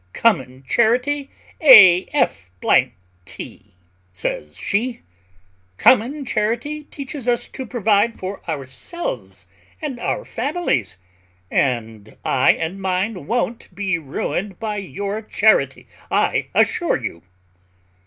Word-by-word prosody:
"Common 135 - +1
charity, 250 - +1 0.3
a 190 - +9
f 275 - 0 0.8
t!" 100 -3 -10 0.4
says 75 -4 -4
she, 235 +4 -2 0.7
"common 260 +4 +3
charity 240 +8 -2
teaches 275 -3 -7
us 240 -1 +1
to 260 - -7
provide 220 -1 +1
for 190 +1 -6
ourselves 155 - -5 0.3
and 285 -6 -5
our - - -2
families; 240 - -2 0.5
and 115 -5 -1
I 130 - +4
and 175 +4 -4
mine 185 -2 -2
won't 235 -5 -2
be 190 -3 -1
ruined 170 +6 -4
by 215 -2 -3
your 200 +2 -4
charity, 210 -11 +2 0.2
I - - +1
assure - - +2
you." 85 - -6
210 Hz, 105 wpm, -20 LUFS, 160-250 Hz, 0.8 s, a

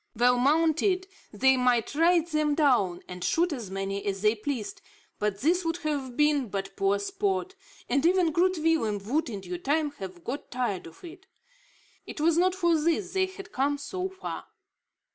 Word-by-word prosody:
Well 245 +2 +3
mounted, 325 +7 +2 0.3
they 265 +5 +3
might 250 -2 +2
ride 335 +2 +4
them 305 -2 +1
down 240 - +2
and 180 -1 -7
shoot 330 - +1
as 235 -8 -6
many 195 +1 -3
as 195 0 -2
they 210 0 +5
pleased, 230 -1 -5 0.4
but 205 -1 -1
this 350 +6 +2
would 330 0 -1
have 275 -5 -2
been 295 -5 +2
but 195 0 -4
poor 195 +1 +2
sport; 385 - -2 0.3
and 275 +3 +1
even 350 -1 +3
Groot 360 +3 +2
Willem 310 -10 +1
would, 290 +6 0
in 205 -4 -5
due 180 -1 -6
time, 295 - 0
have 185 -3 -8
got 270 - -5
tired 235 -9 -2
of 165 - -16
it. 360 +3 -11 0.8
It - - -7
was 320 +2 +3
not 365 +2 +3
for 345 -3 +2
this 335 +4 0
they 380 -1 +2
had 390 +2 -11
come 285 0 0
so 365 +6 -4
far. 380 0 -7
290 Hz, 180 wpm, -27 LUFS, 210-340 Hz, 0.8 s, they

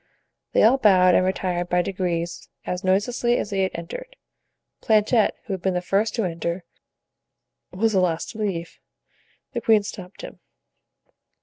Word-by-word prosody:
They - - +4
all 245 +5 +5
bowed, 185 -5 +5
and - - +4
retired 180 -1 -1
by 180 0 +2
degrees 175 -2 -3 0.2
as 180 +1 -3
noiselessly 235 +6 +1
as 210 - -3
they 195 -1 0
had 190 - 0
entered. - - -7 0.7
Planchet, 220 +1 +3
who 220 - -5
had 190 - -4
been 190 0 0
the - - +2
first 200 +4 0
to 230 - 0
enter, 170 0 -3 1.1
was 220 +5 0
the 190 - +3
last 170 -3 0
to 220 - -11
leave. 175 -5 -3 0.7
The - - -2
queen 220 -2 +4
stopped 195 -2 -9
him. - - -9
190 Hz, 155 wpm, -23 LUFS, 180-215 Hz, 1.1 s, all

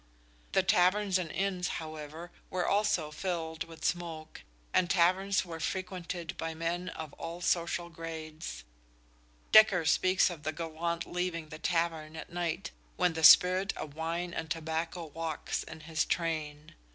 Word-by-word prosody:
The 190 - +4
taverns 190 +1 +3
and 170 -3 -4
inns, 190 -2 -1
however, 155 +1 -7 0.2
were 180 -1 -1
also 200 -7 +1
filled 165 -1 -3
with 165 -1 -9
smoke, 165 -3 -3 0.3
and 180 - +3
taverns 190 +3 +3
were 165 -2 -7
frequented 180 -1 -4
by 165 0 -3
men 170 +3 -2
of 160 -4 -7
all 165 +1 -5
social 170 0 0
grades. 160 - -7 0.9
Dekker 200 -6 +7
speaks 185 +4 +4
of 165 -4 -8
the 155 +1 -2
gallant 170 +1 -3
leaving 175 -3 -3
the 155 - -8
tavern 165 -2 -1
at 160 - -8
night 175 +1 -2 0.2
when 180 -2 +2
"the 160 0 -4
spirit 185 +4 +7
of 145 - -6
wine 170 +3 -3
and 160 -1 -4
tobacco 165 +1 -2
walkes" 160 0 -3
in 160 0 -10
his 155 -1 0
train. 155 -3 -2
170 Hz, 145 wpm, -31 LUFS, 160-180 Hz, 0.9 s, Dekker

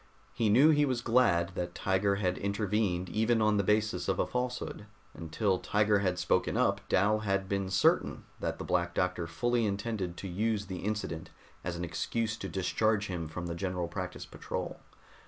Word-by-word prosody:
He 110 -2 +1
knew 135 +9 +7
he 150 -1 +4
was 130 -4 0
glad 115 -9 +3
that 90 0 -5
Tiger 100 +1 +1
had 90 -2 -1
intervened 100 -2 0
even 110 +4 +2
on 105 -1 +3
the 100 - +2
basis 105 -3 +1
of 95 -2 +1
a - - +2
falsehood; 125 -4 -3 0.3
until 90 +5 -1
Tiger 105 0 +2
had 90 -2 0
spoken - - +1
up - - +2
Dal 105 +4 +3
had 100 -2 -1
been 100 -1 -1
certain 95 +1 +2 0.2
that - - -2
the - - -6
Black 85 -1 0
Doctor 90 -2 0
fully 120 +8 0
intended 100 -3 -3
to 100 - -5
use 105 +3 -1
the 95 -2 -6
incident 100 -6 -3 0.3
as 85 0 -3
an 85 +1 -3
excuse 105 +6 -2
to 95 - -5
discharge 105 +3 +1
him 85 -3 -3
from 85 +3 -6
the 85 - -3
General 90 0 -2
Practice 90 +1 -5
Patrol. - - -5
100 Hz, 180 wpm, -31 LUFS, 90-110 Hz, 0.3 s, knew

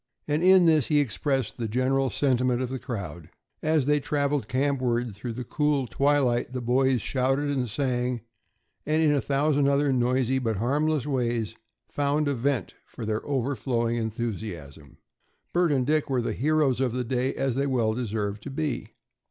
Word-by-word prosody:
And 150 +2 0
in 185 -1 +7
this 155 -5 +4
he 150 -2 +3
expressed 135 - -1
the 115 -2 -2
general 130 +4 +1
sentiment 125 -3 +1
of 130 -1 -2
the 130 0 -4
crowd. 90 - -6 0.3
As 155 -3 +2
they 150 +1 +3
traveled 140 -4 -1
campward 130 -3 0
through 115 +4 -6
the 125 +2 -5
cool 145 +1 0
twilight 130 -2 +1
the 130 - -2
boys 125 0 +2
shouted 135 +2 0
and 130 -4 -1
sang, 125 0 -1 0.6
and 155 +1 +1
in 155 - +4
a 145 -2 +2
thousand 140 +1 +1
other 140 0 +2
noisy 130 +1 +1
but 115 -5 -1
harmless 145 +5 0
ways 120 -6 -1 0.3
found 145 +1 0
a 140 - +1
vent 135 0 -1
for 115 - -8
their 110 0 -2
overflowing 120 -3 -1
enthusiasm. 100 - -5 0.6
Bert 175 -2 +3
and 130 -3 +1
Dick 155 +1 +1
were 130 -3 +1
the - - -2
heroes 145 -2 +1
of 125 -3 0
the 125 0 -1
day, 125 +2 -1
as 135 -2 0
they 140 +3 0
well 120 -5 +1
deserved 105 -3 -3
to 140 - -7
be. 140 0 -3
130 Hz, 170 wpm, -26 LUFS, 120-145 Hz, 0.6 s, in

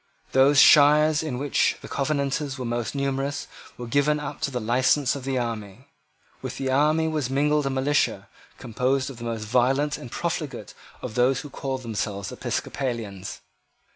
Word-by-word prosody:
Those 135 +2 +5
shires 150 +1 +6
in 155 -6 -3
which 140 +2 +1
the - - -7
Covenanters 140 -1 -1
were 130 - -5
most 120 +2 -3
numerous 140 +1 -2 0.3
were 120 - -6
given 145 +4 +1
up 145 0 -6
to 155 - 0
the 125 -2 -3
license 125 +4 +2
of 135 -2 -7
the 135 -1 -1
army. 115 +1 -5 0.5
With - - -6
the 135 -1 -2
army 155 +4 +3
was 155 -5 -1
mingled 145 +1 +1
a - - +1
militia, 135 +2 0 0.3
composed 130 +4 -1
of 130 - -11
the 120 - -9
most 115 -2 -3
violent 130 +6 +1
and 125 - -9
profligate 140 - -4 0.3
of - - -5
those 125 +2 +2
who 145 - -10
called 135 -1 -4
themselves 100 -4 -3
Episcopalians. 115 -8 -4
135 Hz, 165 wpm, -25 LUFS, 120-145 Hz, 0.5 s, shires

